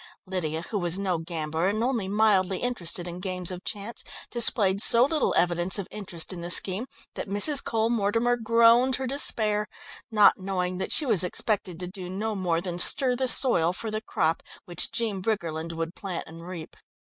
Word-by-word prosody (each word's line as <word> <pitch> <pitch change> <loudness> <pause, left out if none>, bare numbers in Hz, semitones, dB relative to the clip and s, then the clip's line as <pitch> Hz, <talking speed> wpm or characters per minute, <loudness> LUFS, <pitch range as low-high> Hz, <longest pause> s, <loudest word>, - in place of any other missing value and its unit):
Lydia, 165 -4 -3
who 210 - -1
was 175 0 -1
no 185 -4 -1
gambler 160 0 -3
and 215 +3 -1
only 240 -6 -1
mildly 195 -2 +2
interested 180 -8 -3
in 175 +1 -7
games 180 -1 0
of 180 +1 -7
chance, 210 +3 -7 0.3
displayed 205 -5 +2
so 235 +3 +8
little 300 +1 +1
evidence 175 +2 +2
of 200 - -5
interest 185 -5 -3
in 175 - -7
the 170 - -6
scheme 190 +6 -1 0.3
that - - -6
Mrs. 270 +8 +3
Cole 225 0 0
Mortimer 230 +2 +1
groaned 235 +2 +4
her 265 - -4
despair, 215 -6 0 0.4
not 210 -3 +5
knowing 185 -1 -3
that 190 - -3
she 305 - +4
was 210 -8 +3
expected 185 -1 -2
to 180 - -3
do 185 -1 -7
no 215 +4 -3
more 175 -4 -1
than 175 -1 -5
stir 255 +6 +3
the 260 +1 -1
soil 180 - +3
for 220 +3 -5
the 215 0 -3
crop 160 -6 -1 0.2
which 175 -2 -3
Jean 215 -5 -2
Briggerland 170 -6 -3
would 165 +1 -4
plant 190 -4 -5
and 165 +1 -12
reap. 170 -3 -8
195 Hz, 185 wpm, -26 LUFS, 175-225 Hz, 0.4 s, so